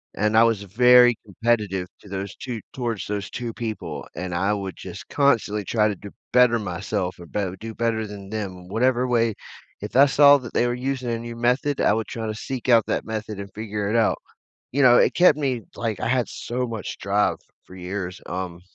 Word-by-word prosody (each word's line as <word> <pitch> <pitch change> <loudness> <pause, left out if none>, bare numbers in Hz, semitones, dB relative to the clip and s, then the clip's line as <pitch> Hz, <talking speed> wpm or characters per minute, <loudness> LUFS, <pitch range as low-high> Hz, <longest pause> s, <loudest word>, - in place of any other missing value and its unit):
and 105 +1 +1
I 115 - +8
was 115 -3 +1
very 125 +4 +6
competitive 100 -3 -1
to 100 - -16
those 100 0 -5
2 120 -4 -5
towards 120 -5 -3
those 100 -2 -4
2 120 -2 -5
people, 110 -2 -5
and 90 0 -4
I 95 +4 +1
would 95 -2 -4
just - - -9
constantly 115 -7 +2
try 110 -2 +2
to 105 - -1
do 100 +2 -10 0.2
better 125 -2 +5
myself 95 0 -3
or 85 - -10
b 105 - -4 0.2
do 115 0 -6
better 115 -1 0
than 100 -1 -9
them. 95 -4 -5
Whatever 125 +5 +1
way 115 -2 +2 0.5
if 105 - -7
I 135 +2 +8
saw 145 0 +7
that 120 -3 -10
they 120 - +2
were 120 - 0
using 130 0 -3
a 115 - -1
new 120 0 -7
method, 125 +4 +1
I 105 - +4
would 110 0 -2
try 115 -1 -5
to 110 - -2
seek 130 +3 -5
out 115 -2 +6
that - - -1
method 110 -2 -5
and 100 -1 -9
figure 105 -1 -3
it 110 - 0
out, 115 - +3 0.6
you 140 +3 +2
know, 120 -2 +7
it - - +3
kept 175 -4 +5
me 130 -6 -1
like, 110 -3 -3
I - - -1
had 125 -1 +1
so 125 +1 -3
much 115 -3 -6
drive 100 +1 +1 0.3
for 95 - -13
years, 90 0 -5
um, 90 -1 -5
110 Hz, 210 wpm, -23 LUFS, 100-120 Hz, 0.6 s, I